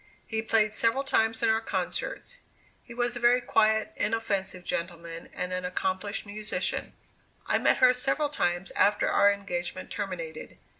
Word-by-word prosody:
He 220 -1 -2
played 220 -1 +2
several 230 +5 +2
times 225 -4 +1
in - - +4
our 220 0 +3
concerts. - - -3 0.4
He - - -16
was 240 0 -1
a - - -3
very 240 +1 +5
quiet, 220 -3 +2
inoffensive 200 -5 -1
gentleman, 170 -1 -5
and 180 0 -4
an 180 0 -2
accomplished 190 +3 -2
musician. 205 -2 -2 0.5
I - - +2
met - - +3
her 255 -1 +6
several 270 +4 0
times 175 -9 -1
after 205 +1 +2
our 200 0 +5
engagement 180 -3 -4
terminated. 170 -6 -5
210 Hz, 150 wpm, -28 LUFS, 185-230 Hz, 0.5 s, her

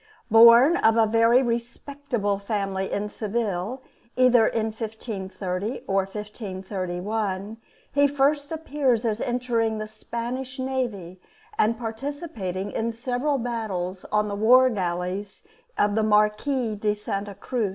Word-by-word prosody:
Born 235 +8 +8
of 220 +1 +3
a 225 - +5
very 230 +3 +4
respectable 235 -2 -2
family 195 -2 -2
in 205 +1 -1
Seville, 215 +2 -3 0.3
either 250 -3 +5
in 220 -1 -1
1530 210 -1 -5
or 195 -1 +1
1531, 195 0 -4 0.4
he 285 0 +4
first 285 +1 +1
appears 280 -7 0
as 220 0 -1
entering 235 -3 0
the 215 - -4
Spanish 240 +4 -5
navy, 235 -9 -3 0.3
and 225 +2 +2
participating 225 - -5
in 230 +1 -1
several 250 +5 -1
battles 205 -7 -3
on 210 0 +2
the 205 - -4
war 250 +5 +5
galleys 185 0 -3 0.3
of 205 0 +2
the 220 - +2
Marquis 215 +2 +1
of 210 0 +1
Santa 200 -1 -4
Cruz. 235 -3 -2
220 Hz, 120 wpm, -25 LUFS, 200-245 Hz, 0.4 s, Born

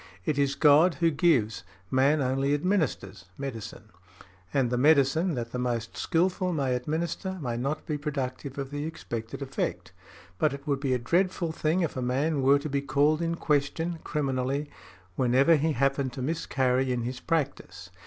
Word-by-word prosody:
It 145 -2 0
is 140 0 +1
God 155 +4 +5
who 170 -1 +2
gives, 140 - +2 0.3
man 140 +3 +3
only 135 +2 +1
administers, 145 - -1
medicine; 115 -5 -7 0.6
and 130 -4 +1
the - - +1
medicine 150 +5 +3
|83| - - -3
that 115 -2 -4
the 125 - -3
most 120 -3 -2
skilful 180 +2 0
may 135 -5 0
administer 165 +8 -2
may 125 -6 -3
not 135 +6 -3
be 150 -2 -3
productive 140 -2 -4
of 135 -1 -4
the 145 0 -3
expected 120 -6 -5
effect; 135 0 -3 0.5
but 150 -2 +2
it 140 +1 -12
would 140 -3 0
be 135 -2 0
a - - +2
dreadful 170 +6 0
thing 160 +3 0
if 165 - -1
a 130 - -2
man 135 +4 0
were 135 +2 +5
to 145 - -5
be 140 -1 -1
called 145 +3 +2
in 170 0 0
question, 160 +2 -1
criminally, 140 0 -2 0.5
whenever 130 +6 +4
he 155 +1 +1
happened 135 -1 0
to 130 - -5
miscarry 130 -3 0
in 120 -2 -1
his 125 +2 -4
practice. 160 -4 -3
140 Hz, 175 wpm, -27 LUFS, 130-160 Hz, 0.6 s, God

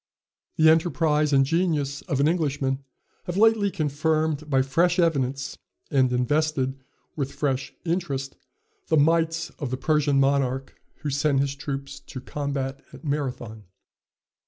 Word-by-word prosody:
The 160 - +5
enterprise 155 -2 +3
and 135 -1 +5
genius 150 -3 0
of 140 -6 -1
an 140 - +4
Englishman 145 -5 0 0.5
have 175 +1 -3
lately 220 -1 +4
confirmed 155 -2 0
by 135 -2 +3
fresh 170 +6 +2
evidence, 140 -5 0 0.3
and 130 -3 +3
invested 135 +1 0 0.3
with 140 -3 -2
fresh 140 -1 -2
interest, 145 -6 -2 0.5
the 160 - +3
might 165 +2 +2
of 145 -5 -3
the 130 - -2
Persian 150 -1 +2
monarch 135 -1 +1 0.3
who 145 -1 -2
sent 140 0 +2
his 140 0 0
troops 140 -1 -6
to 130 - -9
combat 140 0 -4
at - - -13
Marathon. 125 -7 -3
145 Hz, 135 wpm, -25 LUFS, 135-160 Hz, 0.5 s, The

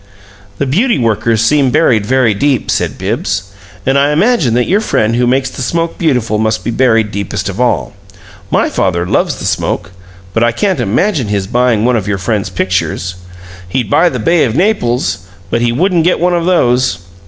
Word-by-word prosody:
"The 140 - -1
beauty 215 - +1
workers 115 -1 +1
seem 140 +2 +3
buried 125 -8 +2
very 130 -4 +2
deep," 130 +3 0
said - - -1
Bibbs. 95 -1 -2 0.4
"And 135 +1 +2
I 140 +1 +2
imagine 155 - +2
that 125 0 +2
your 200 +4 +2
friend 115 - 0
who 120 0 +1
makes 130 +1 +1
the - - -7
smoke 165 +5 -2
beautiful 125 - 0
must 110 0 0
be 120 - -2
buried 115 -3 +2
deepest 100 -2 -3
of - - -4
all. - - 0 0.6
My - - +2
father 85 -2 -1
loves - - 0
the - - -7
smoke, - - -2 0.4
but 115 - +1
I 120 0 +2
can't 190 - 0
imagine 130 - 0
his 100 -2 -1
buying 120 0 +1
one 125 0 +2
of 105 -4 -2
your 105 -1 -1
friend's 100 0 -2
pictures. 90 -1 -2 0.6
He'd 110 +1 -2
buy 175 +2 +4
the 130 - -4
'Bay 160 +9 +2
of 115 -2 -1
Naples,' 120 - 0 0.3
but 115 - 0
he 120 0 +1
wouldn't 170 +6 +1
get 180 - +2
one 180 +1 +1
of 170 -1 0
those. 125 - +2
120 Hz, 190 wpm, -13 LUFS, 105-150 Hz, 0.6 s, buy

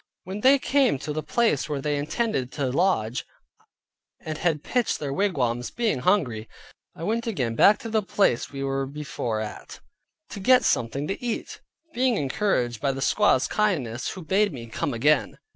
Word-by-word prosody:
When 190 +3 -6
they 270 +3 +6
came 270 - +2
to 150 +3 -5
the 155 - -2
place 220 - +1
where 145 -2 -2
they 145 +1 -1
intended 145 - -1
to 140 -4 -1
lodge, 130 - +1 1.0
and 155 - -5
had 160 -4 0
pitched 245 -2 0
their 140 -2 -4
wigwams, 125 -11 0
being 230 - -1
hungry, 125 - +1 0.5
I 165 - -8
went 230 +5 -1
again 130 - -1
back 205 - +6
to - - -6
the 220 -1 +2
place 195 - +1
we 135 -1 -5
were 135 0 -1
before 135 -6 -4
at, 110 - -8 0.5
to 205 - -7
get 255 +6 +5
something 135 +5 0
to 195 - -4
eat, 235 -2 -4 0.3
being 250 -3 +2
encouraged 130 - 0
by 140 -1 +1
the 135 - -6
squaw's 135 -7 +3
kindness, 145 - -1
who 185 - -7
bade 200 +5 +2
me 120 -6 -7
come 115 +4 -3
again. 140 +5 +2
150 Hz, 175 wpm, -25 LUFS, 130-210 Hz, 1.0 s, they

